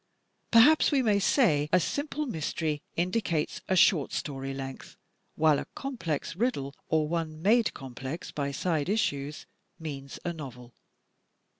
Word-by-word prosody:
Perhaps 270 +9 +6
we 275 -3 +3
may 210 -3 +3
say 155 - +3
a 185 - +5
simple 290 - -2
mystery 155 - -2
indicates 175 -3 -1
a 190 - +3
short 170 -5 +4
story 135 -1 -3
length, 135 -1 -7 0.4
while 155 -2 +4
a - - -6
complex 200 - -3
riddle, 180 - -1 0.2
or 155 -1 +2
one 160 -1 -3
made 225 +3 +4
complex 135 +5 -6
by 140 -1 -2
side 155 +2 -1
issues 150 -9 -1 0.3
means 140 -4 -7
a 175 - -1
novel. 125 -6 -9
160 Hz, 135 wpm, -29 LUFS, 140-205 Hz, 0.4 s, Perhaps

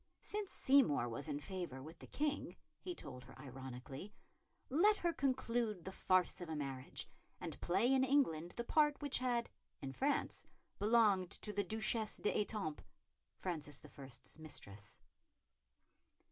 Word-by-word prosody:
Since 415 -1 -1
Seymour 260 - +4
was 120 +6 -4
in 145 -1 -2
favour 175 -4 -4
with 160 +3 -10
the - - -10
King, 295 0 -1 0.2
he 360 -1 -5
told 125 - -7
her 130 - -13
ironically, 135 +5 -7 0.6
let 405 +10 +5
her 345 -1 +1
conclude 235 - 0
the 190 - -3
farce 185 -1 +3
of 175 - -5
a 160 - -2
marriage, 135 -3 -3 0.3
and - - -6
play 200 +9 +3
in 260 -1 +5
England 245 - +2
the 235 - 0
part 295 +3 +4
which 285 -3 +2
had, 245 -2 +1 0.3
in 135 -1 -5
France, 280 - 0 0.4
belonged 205 -4 +5
to 210 +1 -4
the 205 0 +1
Duchesse 220 +2 +1
d'Étampes, 205 -7 0 0.6
Francis 150 -5 -3
I.'s 135 0 -8
mistress. 105 -9 -8
190 Hz, 140 wpm, -39 LUFS, -, 0.6 s, let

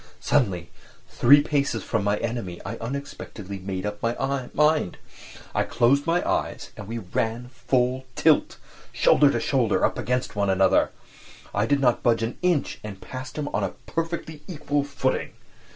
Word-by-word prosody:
Suddenly, 95 - +1 0.4
three 145 +4 +6
paces 145 -2 0
from 110 -3 -1
my 100 +1 +1
enemy, 115 -7 -4
I 115 - -4
unexpectedly 115 -6 -6
made 95 0 -4
up 105 0 -4
my 130 +3 -1
mind—I 150 - -1
closed 130 +6 +2
my 170 +2 +1
eyes, - - -2
and 100 - -9
we 115 +2 -4
ran 115 +4 -2
full 130 0 0
tilt, - - +3 0.3
shoulder - - +5
to - - 0
shoulder, - - +1
against 125 -1 0
one 100 -1 +1
another! 95 0 +4 0.6
I 105 +2 +1
did 145 -1 +2
not 125 -3 +3
budge 115 -1 +2
an 115 - -3
inch 180 -5 +1
and 105 -3 -7
passed 130 +6 -8
him 150 -1 -2
on 105 - -1
a 95 - -3
perfectly 165 -2 -4
equal 145 -5 -1
footing! 140 -2 -2
125 Hz, 150 wpm, -25 LUFS, 105-140 Hz, 0.6 s, three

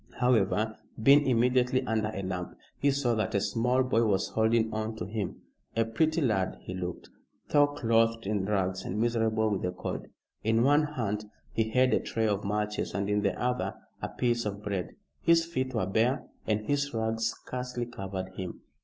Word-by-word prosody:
However, 110 -3 +2 0.2
being 140 +3 +7
immediately 125 +1 +3
under 110 -2 0
a 95 -2 -4
lamp, 90 -1 -4 0.2
he 140 - +3
saw 135 -3 +1
that 110 -3 -1
a - - +4
small 125 +5 +1
boy 125 -3 +2
was 100 -4 +1
holding 110 0 +2
on 110 +1 -2
to 90 - -4
him. 105 +1 -4 0.3
A 115 0 +2
pretty 160 +9 +1
lad 105 -8 +1
he 90 - -6
looked, 90 -1 -5 0.4
though 145 -1 +5
clothed 115 -5 +1
in 100 -1 0
rags 95 -2 0
and 105 - -3
miserable 110 -2 +1
with 100 - 0
the 90 - 0
cold. - - -5 0.4
In 110 +2 +3
one 145 +3 +5
hand 105 -3 -2 0.3
he 110 -1 +1
held 130 +2 +3
a - - +4
tray 110 -1 -1
of 105 -1 0
matches 105 -1 -2
and 100 +1 -1
in 105 0 +2
the 100 - 0
other 125 0 -1 0.3
a - - -3
piece 120 -1 0
of 105 0 -4
bread. 100 -4 -3 0.3
His 165 0 +4
feet 130 -6 -2
were 110 - +1
bare 115 +8 +1 0.2
and 110 -1 +1
his 140 -1 0
rags 110 0 0
scarcely 125 +1 -4
covered 95 -5 -5
him. 95 -1 -7
110 Hz, 185 wpm, -29 LUFS, 105-125 Hz, 0.4 s, being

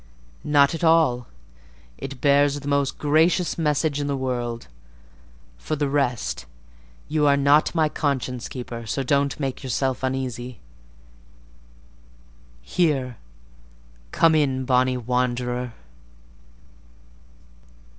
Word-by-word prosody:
"Not 145 -1 +4
at 165 - -5
all—it 125 - -2
bears 145 0 +3
the 140 - -9
most 140 -1 0
gracious 160 +4 +2
message 150 -1 +1
in 145 - -2
the 140 -1 -1
world: 120 -3 -3 0.9
for 155 - -3
the 145 -1 -1
rest, 125 - -1 0.6
you 150 -1 +1
are 140 0 +4
not 145 +4 +3
my 160 -2 +3
conscience 130 -5 -2
keeper, 120 -3 -7
so 135 +5 -2
don't 140 +2 +1
make 135 -3 -3
yourself 130 -1 -1
uneasy. 130 -2 -3 2.0
Here, 130 - 0 0.9
come 165 -1 +4
in, 135 -4 +1
bonny 130 0 +2
wanderer!" 125 0 -1
135 Hz, 100 wpm, -23 LUFS, 125-145 Hz, 2.0 s, Not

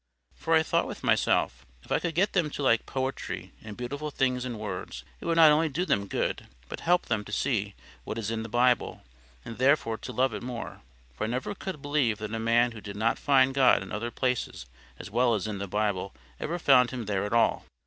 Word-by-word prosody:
For 165 - 0
I 160 - +5
thought - - +1
with - - -8
myself, 60 +1 +2 0.2
if - - -17
I - - +3
could 170 -3 -3
get 195 +4 +2
them 170 -6 +2
to 145 - -5
like 115 -4 +2
poetry 130 0 -4
and 105 -2 -9
beautiful 145 +5 -4
things 130 -3 0
in 120 -3 -4
words, 95 - -6 0.2
it - - -10
would 165 - +1
not 160 -2 +8
only 155 +2 +3
do 170 +6 -1
them 100 - 0
good, - - -2 0.2
but - - -6
help 175 +1 +2
them 110 -2 -1
to 105 - -11
see 105 -4 -1 0.3
what - - -5
is 110 -1 -3
in 115 -1 -2
the 115 - -6
Bible, 120 +2 +1 0.4
and 115 - -8
therefore 130 -4 +2
to - - -7
love 125 0 +1
it - - -5
more. 120 -1 -6 0.3
For 65 - -3
I - - -2
never 125 - -2
could 190 -7 -7
believe 140 -7 +1
that 110 +1 -6
a 115 - -2
man 120 +2 +3
who 110 -2 -10
did 100 -1 -8
not 110 +3 0
find 135 -2 +4
God 130 -7 +4
in 95 - -10
other 110 +4 -3
places 125 - -2 0.3
as - - -9
well 120 +1 +3
as 100 - -2
in 105 -2 -4
the 100 - -4
Bible 100 -1 -1 0.2
ever 170 +3 -2
found 130 -6 +5
Him 125 -3 -5
there 100 -1 -1
at 105 - -3
all. 115 - +2
120 Hz, 230 wpm, -28 LUFS, 105-140 Hz, 0.4 s, not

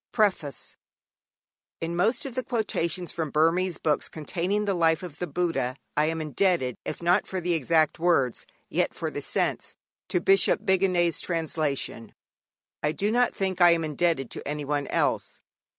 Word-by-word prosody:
_ - - -67
PREFACE 190 - -1 1.0
In 165 +1 -3
most 220 +9 +1
of 270 - -5
the 255 +1 -2
quotations 185 -7 -1
from 160 -3 -3
Burmese 165 +4 +2
books 150 -2 0
containing 180 +6 -2
the 200 - +1
life 165 -2 +2
of 165 -5 -8
the 180 - -2
Buddha 140 -6 -1 0.2
I 150 - +3
am 160 +1 -1
indebted, 155 - +1
if - - -6
not 175 +2 +3
for 190 - -3
the 175 0 0
exact 160 +1 +2
words, 160 -8 +1 0.2
yet - - 0
for - - -3
the - - -5
sense, - - -1 0.3
to 180 - +1
Bishop 195 +3 +3
Bigandet's 180 -3 +2
translation. 155 -8 -2 0.7
I 150 0 0
do 205 +6 0
not 245 +1 +2
think 190 -2 -2
I 175 -1 +8
am 165 -1 0
indebted 155 -3 0
to - - -6
anyone 145 -1 -2
else. - - -1
170 Hz, 165 wpm, -26 LUFS, 150-185 Hz, 1.0 s, I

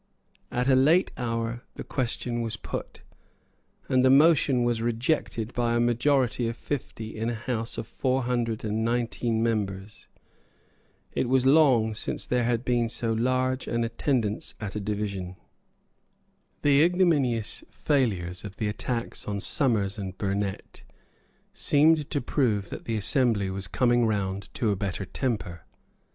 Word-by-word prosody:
At 125 +1 0
a 135 - +5
late 150 +8 +4
hour 115 0 -2
the - - -6
question 120 -2 -2
was 115 -2 -3
put; - - -7 0.8
and 130 -1 +3
the 130 - +5
motion 140 -3 +5
was 120 -1 0
rejected 120 -1 -1
by 120 -1 +1
a - - +2
majority 120 0 +2
of 115 0 -4
fifty 115 -6 -5
in 110 +1 -2
a 120 - -2
house 115 0 -3
of - - -3
four 130 +3 -1
hundred 120 -2 -1
and 110 +1 -1
nineteen 115 -1 0
members. 105 -3 -3 1.0
It 120 - -1
was 130 0 +3
long 130 -6 +5
since 105 - -4
there 125 -1 +1
had 120 +1 0
been 120 -2 +1
so 115 0 -1
large 130 +3 0
an 120 0 0
attendance 115 -2 -1
at 105 -2 -5
a - - -1
division. 100 -3 -3 1.3
The 145 0 +5
ignominious 155 - +2
failure 110 - 0
of 100 -1 -8
the 110 -3 -1
attacks 115 +3 -4
on 100 -1 -2
Somers 105 -4 +1
and 95 -2 -5
Burnet 100 -1 -3 0.7
seemed 150 0 +3
to 145 - -1
prove 110 -6 0
that - - -7
the 115 - -2
assembly 105 -3 +1
was 95 0 -4
coming 120 +6 +2
round 100 -2 -2
to 110 -3 +1
a - - +1
better 95 0 -3
temper. 95 - -3
115 Hz, 145 wpm, -27 LUFS, 105-130 Hz, 1.3 s, a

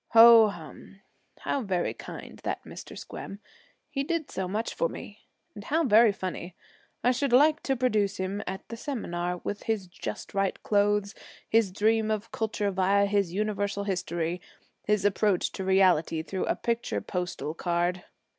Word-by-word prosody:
Ho, 230 -1 +9
hum! 195 +1 -10 0.4
How 280 - -1
very 185 -6 -1
kind, - - -9
that - - -3
Mr. - - -10
Squem, 195 - -8 0.5
he 280 -2 -2
did 330 0 -2
so 190 -1 -3
much 215 +5 -2
for 165 - 0
me, 210 - -9 0.3
and 205 - -9
how 320 +3 +1
very 225 -3 +6
funny! 185 -2 -6 0.5
I 245 - +5
should 265 +1 0
like 300 +5 +5
to 270 - 0
produce 215 -6 +1
him 190 +2 -3
at 190 +1 -5
the 230 - -6
seminar 180 -10 -3
with 205 - -4
his 220 -4 -1
just 180 - -7
right 195 -1 0
clothes, 205 0 +2 0.3
his 225 -4 +3
dream 220 +2 +2
of 215 +1 -2
culture 210 -2 -1
via 195 +2 +3
his 200 -3 +1
Universal 205 0 -1
History, 175 -3 -2 0.4
his 210 -1 +1
approach 205 -2 +2
to 190 - -5
reality 185 -4 +3
through 190 +3 -3
a - - 0
picture 235 0 -1
postal 180 -4 -4
card!' 175 +1 -1
205 Hz, 160 wpm, -28 LUFS, 185-225 Hz, 0.5 s, Ho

